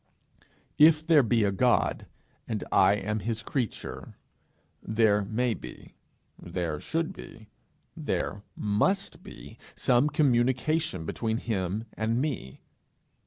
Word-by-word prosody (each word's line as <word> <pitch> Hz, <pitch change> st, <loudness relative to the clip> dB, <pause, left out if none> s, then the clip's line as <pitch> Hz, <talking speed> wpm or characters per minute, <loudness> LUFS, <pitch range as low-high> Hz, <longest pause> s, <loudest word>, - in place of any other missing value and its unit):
If 155 Hz, 0 st, +6 dB
there 160 Hz, -3 st, +6 dB
be 115 Hz, -2 st, +2 dB
a 100 Hz, -, +2 dB
God, 120 Hz, +5 st, +1 dB, 0.4 s
and 110 Hz, -3 st, -3 dB
I 95 Hz, 0 st, +5 dB
am 105 Hz, +1 st, -2 dB
his 110 Hz, +1 st, -3 dB
creature, 125 Hz, 0 st, -4 dB, 0.6 s
there 110 Hz, -2 st, +2 dB
may 115 Hz, +4 st, 0 dB
be, -, -, -11 dB, 0.5 s
there 85 Hz, -3 st, -3 dB
should 165 Hz, -, -2 dB
be, 110 Hz, -1 st, -12 dB, 0.5 s
there 100 Hz, -, -2 dB
must 150 Hz, -, 0 dB
be -, -, -12 dB, 0.2 s
some 125 Hz, +3 st, +3 dB
communication 135 Hz, -, +1 dB
open -, -, -7 dB
between 110 Hz, +5 st, -2 dB
him 100 Hz, -2 st, -2 dB
and 115 Hz, +2 st, -1 dB
me. 125 Hz, -, -4 dB
115 Hz, 120 wpm, -28 LUFS, 100-135 Hz, 0.6 s, If